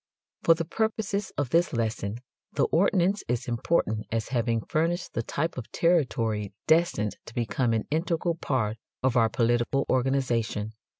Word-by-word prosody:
For 165 - +5
the 165 0 -3
purposes 210 +2 -1
of 140 -4 -1
this 170 -1 +3
lesson 110 -3 -1 0.4
the - - +2
ordinance 190 +2 +2
is 120 0 -1
important 120 -3 0
as 115 -1 -1
having 115 -2 0
furnished 170 - -1
the - - 0
type 150 +5 -2
of 115 - -9
territory 115 - +1
destined 160 - +2
to 115 - -11
become 120 +1 0
an 110 -1 0
integral 170 +2 0
part 120 -9 -1 0.3
of 130 -1 +2
our 115 -2 +4
political 120 +4 +1
organization. 120 -5 0
130 Hz, 145 wpm, -27 LUFS, 115-165 Hz, 0.4 s, For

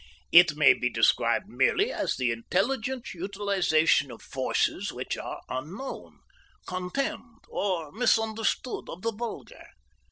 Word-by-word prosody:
It 170 -3 +7
may 150 -1 +6
be 125 - -1
described - - +2
merely - - +2
as - - -1
the 125 -2 0
intelligent 230 - -2
utilization 190 -6 +1
of 120 - -11
forces 130 -2 -1
which - - -4
are - - -6
unknown, 170 - -7 0.4
contemned, 225 +5 -4
or 175 -7 -2
misunderstood 225 +1 0
of 180 - -8
the 230 - 0
vulgar. 230 +2 -7
190 Hz, 120 wpm, -27 LUFS, 155-225 Hz, 0.4 s, It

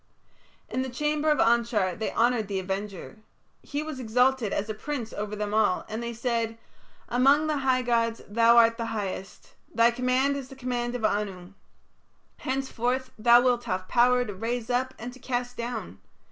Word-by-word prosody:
In 255 - -2
the 260 - -3
chamber 300 +4 0
of 300 - +3
Anshar 230 -5 +2
they 220 - -3
honoured 235 -2 +2
the 195 -1 -2
Avenger. 195 +2 -5 0.4
He 290 +1 -4
was 310 -4 -6
exalted 250 -1 +2
as 200 - -1
a 215 - -3
prince 240 0 -5
over 210 0 -4
them 210 0 -3
all, 215 -4 +2
and 220 +2 -4
they 235 0 -3
said: 230 -1 -2 0.5
"Among 275 +5 +4
the 305 -1 0
high 260 -2 +1
gods 230 -1 +1
thou 230 +2 +4
art 230 0 +6
the 230 -1 -3
highest; 195 -1 -6 0.2
thy 230 +1 +4
command 255 +3 +1
is 265 -2 -7
the 270 - -11
command 245 -2 -3
of 230 -3 -1
Anu. 195 -3 -2 0.8
Henceforth 260 -1 -2
thou 240 +2 +7
wilt 245 -1 +1
have 185 0 -3
power 245 +1 +3
to 210 - -5
raise 230 +4 -3
up 255 +1 0
and 240 +2 -7
to 260 - -14
cast 245 -1 -3
down. 225 - -5
235 Hz, 175 wpm, -27 LUFS, 215-255 Hz, 0.8 s, thou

